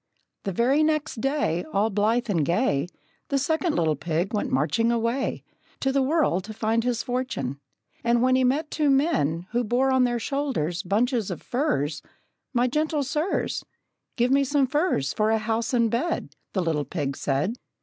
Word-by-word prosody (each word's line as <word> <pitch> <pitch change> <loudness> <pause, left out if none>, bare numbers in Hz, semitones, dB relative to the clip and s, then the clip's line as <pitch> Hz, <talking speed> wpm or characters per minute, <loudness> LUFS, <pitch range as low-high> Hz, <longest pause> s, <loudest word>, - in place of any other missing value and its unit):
The 195 - -1
very 250 - +2
next 305 -6 0
day, 270 - 0
All 210 +3 +2
blithe 220 +5 +1
and 175 -8 +1
gay, 170 - +1 0.4
The 280 - +1
second 320 +4 0
little 160 -2 +2
pig 165 - -2
went 210 - -1
marching 215 - +2
away 235 +3 -1 0.4
To 270 - +1
the 275 0 +2
world 265 - +2
to 220 0 -8
find 225 +1 +1
his 245 -1 0
fortune. 245 - -3 0.4
And 235 0 +3
when 255 0 +4
He 260 - +3
met 290 +5 +1
two 300 -2 +1
men, 270 - +2
Who 240 +1 +1
bore 250 +4 +2
on 260 -1 +4
their 240 -1 0
shoulders 235 - -1
bunches 220 +3 0
of 180 - -6
furze, 155 - -1 0.5
"My 245 -2 +2
gentle 300 +3 0
sirs, 300 +7 -1 0.5
Give 245 +1 +2
me 275 +1 +4
some 275 0 +2
furze 260 - 0
for 215 0 +1
a 220 - +3
house 225 +1 -1
and 235 -3 +2
bed!" 330 +9 -2 0.2
The 185 - 0
little 160 -3 0
pig 140 -5 -3
said. 145 - -1
235 Hz, 175 wpm, -25 LUFS, 185-275 Hz, 0.5 s, when